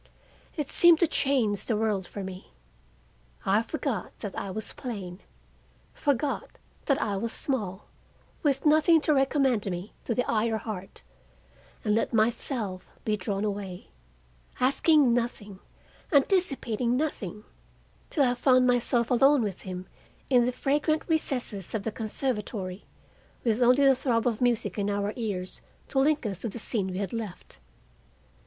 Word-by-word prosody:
It 295 -3 -3
seemed 345 -2 +6
to - - +7
change 245 - +1
the 225 - 0
world 210 -4 0
for 200 - -6
me. 185 0 -9 0.9
I 200 +3 +3
forgot 235 - -4
that 205 -3 -5
I 200 - -4
was 215 +3 -4
plain, 195 -7 -6 0.7
forgot 285 0 -1 0.3
that 275 - +2
I 200 -2 -1
was 230 +3 -2
small, 210 -8 -3 0.6
with 280 -3 +1
nothing 310 +2 +5
to 305 - +2
recommend 270 -6 +2
me 180 +3 -5
to 230 - -1
the 250 - 0
eye 225 0 +1
or 220 -1 0
heart, 205 -4 -7 0.8
and 210 - +2
let 225 - 0
myself 220 -3 0 0.2
be 215 - +1
drawn 200 0 -3
away, 195 -3 -5 0.7
asking 275 0 +4
nothing, 215 -5 -3 0.5
anticipating 270 - +2
nothing, 215 - -3 0.7
till 290 - +2
I 245 -2 +3
found 255 0 +4
myself 245 0 +2
alone 270 +1 +5
with 200 -4 -4
him 185 -1 -6 0.5
in 245 -2 +5
the 250 - +1
fragrant 295 +5 0
recesses 250 - 0
of 210 - -2
the 225 - -2
conservatory, 210 -4 -3 0.6
with 230 0 +1
only 250 +3 +5
the 270 - +7
throb 250 -3 0
of 235 -2 0
music 220 -5 +1
in 200 0 0
our 205 +1 -1
ears 200 -6 -3 0.3
to 270 - +1
link 295 0 +2
us 195 -4 -3
to 230 - -2
the 205 - -8
scene 210 -3 -2
we 185 -1 -4
had 195 0 -3
left. 220 -6 -7
230 Hz, 150 wpm, -27 LUFS, 205-270 Hz, 0.9 s, to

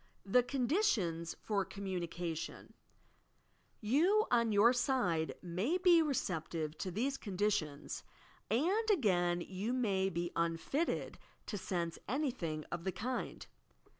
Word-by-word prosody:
THE 225 +6 +5
CONDITIONS 245 - 0
FOR 205 -3 +1
COMM0NICATION 175 -4 -4 1.1
You, 335 - +3
on 235 -2 +3
your 215 +4 +6
side, 240 - +1
may 185 - 0
be 355 -2 +6
receptive 165 - -2
to 185 - -2
these 255 +9 -1
condi 205 +1 0
tions, 150 -7 -3 0.5
and 365 - +2
again 175 - +3
you 195 +7 -3
may 195 -7 +1
be 175 -1 -2
unfitted 170 - -1 0.3
to 215 - -4
sense 170 -4 -2
anyibing 235 - -1
of 170 -1 -3
the 190 - -1
tund. 250 +7 -4
205 Hz, 115 wpm, -35 LUFS, 175-260 Hz, 1.1 s, your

